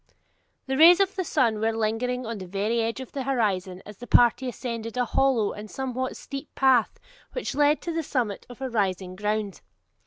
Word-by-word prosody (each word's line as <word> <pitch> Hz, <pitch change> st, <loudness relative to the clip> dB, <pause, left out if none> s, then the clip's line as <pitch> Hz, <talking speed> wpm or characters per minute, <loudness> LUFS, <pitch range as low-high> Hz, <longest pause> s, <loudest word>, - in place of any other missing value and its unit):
The 265 Hz, 0 st, -2 dB
rays 345 Hz, +3 st, +9 dB
of 390 Hz, -1 st, +1 dB
the 375 Hz, -, -1 dB
sun 240 Hz, -10 st, +1 dB
were 225 Hz, +1 st, 0 dB
lingering 245 Hz, +3 st, -1 dB
on 225 Hz, -2 st, -5 dB
the 185 Hz, -, -8 dB
very 205 Hz, +5 st, -1 dB
verge 230 Hz, +2 st, -1 dB
of 260 Hz, -, -9 dB
the 275 Hz, -, -4 dB
horizon 200 Hz, -8 st, -1 dB
as 210 Hz, -1 st, -11 dB
the 245 Hz, -, -10 dB
party 245 Hz, +2 st, +4 dB
ascended 230 Hz, -2 st, -5 dB
a 250 Hz, -, +2 dB
hollow 250 Hz, -5 st, +2 dB
and 210 Hz, +1 st, -9 dB
somewhat 260 Hz, +1 st, -3 dB
steep 275 Hz, +2 st, -8 dB
path 260 Hz, -4 st, +3 dB, 0.3 s
which -, -, -3 dB
led 295 Hz, +1 st, +2 dB
to 340 Hz, -, -3 dB
the 330 Hz, -, -1 dB
summit 245 Hz, -9 st, -2 dB
of 245 Hz, +1 st, -12 dB
a 265 Hz, -, -2 dB
rising 190 Hz, -4 st, -1 dB
ground. 210 Hz, 0 st, -2 dB
240 Hz, 195 wpm, -26 LUFS, 215-265 Hz, 0.3 s, rays